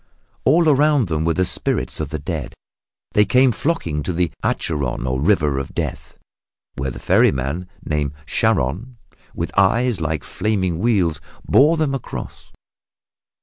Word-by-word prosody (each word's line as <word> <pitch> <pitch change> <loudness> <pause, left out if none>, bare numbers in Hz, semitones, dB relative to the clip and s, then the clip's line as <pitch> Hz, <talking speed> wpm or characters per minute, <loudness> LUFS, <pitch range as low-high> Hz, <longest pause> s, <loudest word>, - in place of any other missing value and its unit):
All 160 +5 +4
around 145 - +3
them 80 0 -1
were 85 -1 +1
the 95 - +2
spirits - - -1
of 75 -3 -3
the 80 - -3
dead. 70 - -5 0.6
They 105 - +4
came 125 +5 +4
flocking 110 - -1
to 90 - -3
the 85 -1 0
Acheron 70 -6 -1
or 65 0 -1
River 75 -6 +2
of 70 - -7
Death, - - -4 0.6
where 70 0 -2
the 60 - -8
ferryman 70 +7 +1 0.2
named 75 -2 -1
Charon, 95 - 0 0.4
with 85 - -4
eyes 110 +1 +2
like 80 -2 -2
flaming 95 -6 -1
wheels, 90 -9 +1 0.3
bore 150 +5 +5
them 155 -3 0
across. 135 - -7
90 Hz, 145 wpm, -20 LUFS, 75-120 Hz, 0.6 s, bore